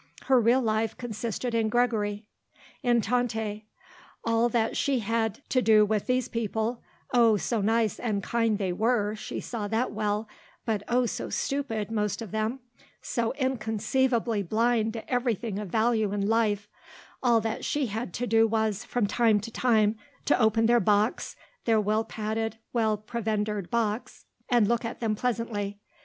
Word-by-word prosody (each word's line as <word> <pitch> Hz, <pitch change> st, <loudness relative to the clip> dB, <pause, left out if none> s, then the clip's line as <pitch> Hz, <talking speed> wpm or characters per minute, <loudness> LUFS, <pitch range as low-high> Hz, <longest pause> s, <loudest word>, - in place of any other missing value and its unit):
Her 260 Hz, -2 st, +4 dB
real 240 Hz, +4 st, +4 dB
life 220 Hz, 0 st, 0 dB
consisted 235 Hz, +1 st, -4 dB
in 225 Hz, -1 st, +1 dB
Gregory; 215 Hz, -3 st, 0 dB, 0.6 s
in 240 Hz, -3 st, +3 dB
Tante. 220 Hz, -2 st, -1 dB, 0.6 s
All 230 Hz, +1 st, +2 dB
that 225 Hz, -1 st, 0 dB
she 275 Hz, -2 st, +1 dB
had 225 Hz, +2 st, -2 dB
to 255 Hz, -, +2 dB
do 215 Hz, -3 st, +5 dB
with 210 Hz, -1 st, -1 dB
these 250 Hz, -1 st, +1 dB
people 230 Hz, +1 st, -2 dB, 0.3 s
oh, 230 Hz, -3 st, +5 dB
so 225 Hz, +2 st, -1 dB
nice 220 Hz, 0 st, +1 dB
and 205 Hz, -4 st, -1 dB
kind 230 Hz, -2 st, +1 dB
they 190 Hz, -3 st, -1 dB
were, 215 Hz, +1 st, +1 dB
she 215 Hz, -, -5 dB
saw 220 Hz, -4 st, -4 dB
that 225 Hz, +4 st, 0 dB
well, 210 Hz, 0 st, -1 dB, 0.4 s
but 220 Hz, -3 st, 0 dB
oh 245 Hz, +1 st, +2 dB
so -, -, -4 dB
stupid, 230 Hz, -7 st, -2 dB
most 210 Hz, -3 st, -1 dB
of 225 Hz, -4 st, -7 dB
them, 220 Hz, +4 st, -2 dB, 0.4 s
so 230 Hz, -1 st, -1 dB
inconceivably 240 Hz, -2 st, 0 dB
blind 220 Hz, +3 st, +1 dB
to 225 Hz, -, -7 dB
everything 235 Hz, -4 st, -1 dB
of 210 Hz, -3 st, -5 dB
value 220 Hz, 0 st, +2 dB
in 200 Hz, -1 st, -1 dB
life 215 Hz, -2 st, +1 dB, 0.5 s
all 235 Hz, -3 st, +4 dB
that 225 Hz, 0 st, -3 dB
she 290 Hz, -2 st, 0 dB
had 220 Hz, -2 st, -4 dB
to 245 Hz, -, -1 dB
do 225 Hz, -1 st, +4 dB
was, 220 Hz, -2 st, 0 dB
from 245 Hz, -4 st, 0 dB
time 220 Hz, 0 st, +3 dB
to 230 Hz, +3 st, -7 dB
time, 220 Hz, -3 st, +2 dB, 0.3 s
to 290 Hz, -, +3 dB
open 220 Hz, +1 st, +3 dB
their 240 Hz, +1 st, +5 dB
box, 210 Hz, +2 st, +1 dB, 0.3 s
their 225 Hz, -2 st, +4 dB
well 215 Hz, +1 st, +1 dB
padded, 220 Hz, 0 st, -3 dB, 0.2 s
well 220 Hz, -3 st, +2 dB
provendered 210 Hz, -3 st, -2 dB
box, 230 Hz, -1 st, -2 dB, 0.2 s
and 240 Hz, -5 st, +4 dB
look 235 Hz, +1 st, +1 dB
at 230 Hz, -, -5 dB
them 225 Hz, -2 st, 0 dB
pleasantly. 215 Hz, -3 st, -2 dB
225 Hz, 160 wpm, -27 LUFS, 210-235 Hz, 0.6 s, do